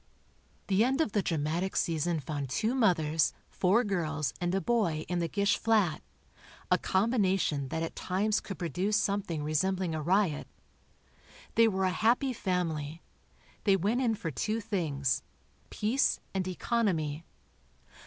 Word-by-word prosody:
The 195 Hz, +2 st, +3 dB
end 265 Hz, +4 st, +1 dB
of 315 Hz, -9 st, +1 dB
the 205 Hz, -, +1 dB
dramatic 165 Hz, +3 st, -1 dB
season 165 Hz, 0 st, 0 dB
found 145 Hz, -1 st, -4 dB
two 220 Hz, -, 0 dB
mothers, 165 Hz, -, +2 dB, 0.2 s
four 195 Hz, +6 st, +2 dB
girls 160 Hz, -, -1 dB
and 175 Hz, +1 st, 0 dB
a -, -, +2 dB
boy 195 Hz, -9 st, 0 dB
in 180 Hz, -1 st, -1 dB
the 170 Hz, -, 0 dB
Gish 200 Hz, +3 st, +1 dB
flat, 210 Hz, -9 st, +2 dB, 0.7 s
a -, -, +5 dB
combination 190 Hz, -, +1 dB
that 160 Hz, +5 st, -2 dB
at 165 Hz, -, -5 dB
times 205 Hz, +4 st, 0 dB
could 195 Hz, -, -7 dB
produce 185 Hz, +5 st, 0 dB
something 200 Hz, -7 st, -1 dB
resembling 180 Hz, +3 st, 0 dB
a 155 Hz, -, -2 dB
riot. 175 Hz, -1 st, +1 dB, 1.1 s
They 230 Hz, 0 st, +5 dB
were 190 Hz, -3 st, 0 dB
a 185 Hz, -, +2 dB
happy 240 Hz, +7 st, +2 dB
family. 165 Hz, -6 st, -2 dB, 0.6 s
They 200 Hz, -2 st, +4 dB
went 210 Hz, +7 st, +1 dB
in 230 Hz, -3 st, +2 dB
for 165 Hz, -5 st, -4 dB
two 215 Hz, -, -1 dB
things: 165 Hz, -, -1 dB, 0.5 s
peace, 235 Hz, +7 st, +1 dB
and 190 Hz, -1 st, -1 dB
economy. 175 Hz, -7 st, -1 dB
185 Hz, 145 wpm, -30 LUFS, 160-210 Hz, 1.1 s, a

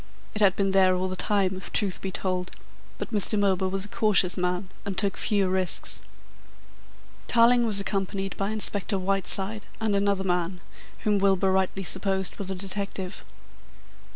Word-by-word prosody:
It 210 Hz, -, -2 dB
had 195 Hz, -2 st, +4 dB
been 195 Hz, -1 st, 0 dB
there 190 Hz, -1 st, +4 dB
all 185 Hz, +1 st, -1 dB
the 185 Hz, -, -4 dB
time, 190 Hz, 0 st, +1 dB
if 185 Hz, -, -10 dB
the -, -, -2 dB
truth 200 Hz, -3 st, -1 dB
be 195 Hz, -, -3 dB
told, 185 Hz, -2 st, -2 dB, 0.5 s
but -, -, -6 dB
Mr. 210 Hz, 0 st, 0 dB
Milburgh 190 Hz, -2 st, +1 dB
was 195 Hz, 0 st, +2 dB
a -, -, -7 dB
cautious 205 Hz, -4 st, +2 dB
man 180 Hz, +1 st, -2 dB, 0.2 s
and 200 Hz, -2 st, -5 dB
took 200 Hz, -2 st, +1 dB
few 200 Hz, -3 st, 0 dB
risks. 185 Hz, -1 st, -1 dB, 1.3 s
Tarling 235 Hz, 0 st, +4 dB
was 205 Hz, -2 st, +1 dB
accompanied 195 Hz, -1 st, -3 dB
by 195 Hz, 0 st, -2 dB
Inspector 205 Hz, -2 st, +1 dB
Whiteside 195 Hz, +2 st, +2 dB
and 220 Hz, -2 st, 0 dB
another 200 Hz, -1 st, 0 dB
man, 180 Hz, -1 st, -1 dB, 0.4 s
whom 210 Hz, -1 st, +1 dB
Milburgh 195 Hz, -1 st, +2 dB
rightly 190 Hz, 0 st, -1 dB
supposed 190 Hz, +1 st, +2 dB
was 195 Hz, -2 st, -4 dB
a 190 Hz, -, -3 dB
detective. 195 Hz, 0 st, -4 dB
195 Hz, 165 wpm, -25 LUFS, 185-200 Hz, 1.3 s, had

